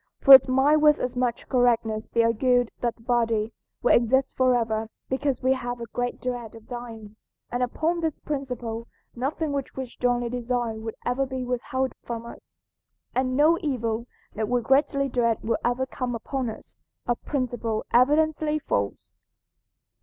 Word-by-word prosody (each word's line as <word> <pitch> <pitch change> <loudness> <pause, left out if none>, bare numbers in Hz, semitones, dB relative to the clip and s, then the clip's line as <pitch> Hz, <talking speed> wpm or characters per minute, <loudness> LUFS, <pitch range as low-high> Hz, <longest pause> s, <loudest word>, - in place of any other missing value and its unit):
For 275 - +9
it 265 -1 +10
might 270 +4 +4
with 300 -1 +5
as 250 - -3
much 245 -2 -1
correctness 230 -4 +1
be 230 - +2
argued 245 +1 +2
that 240 -1 -1
the 230 - -21
body 230 -2 +1 0.3
will 245 - +5
exist 265 +3 +2
forever 230 -4 +1 0.2
because 265 -1 -1
we 260 +1 +4
have 245 -2 -4
a 235 - -5
great 245 0 -2
dread 245 -3 -4
of 225 -1 -14
dying, 225 -4 -8 0.3
and 245 - -1
upon 315 +7 0
this 320 -3 -2
principle 245 -5 -4 0.3
nothing 285 +5 -2
which 280 -2 -4
we 265 - -3
strongly 245 0 -1
desire 240 -1 -2
would 220 0 -6
ever 265 +2 0
be 260 -1 -4
withheld 255 +1 -2
from 235 -1 -5
us, 235 - -13 0.6
and 255 0 0
no 315 +3 +5
evil 235 -6 -2 0.3
that 220 0 -2
we 245 0 +2
greatly 275 +3 +2
dread 235 -3 0
will 225 0 0
ever 245 +2 +1
come 255 -2 -4
upon 255 +2 -3
us, 220 - -11 0.3
a 240 - +1
principle 240 -5 -3
evidently 300 +4 +3
false. 100 - -3
245 Hz, 160 wpm, -25 LUFS, 230-265 Hz, 0.6 s, it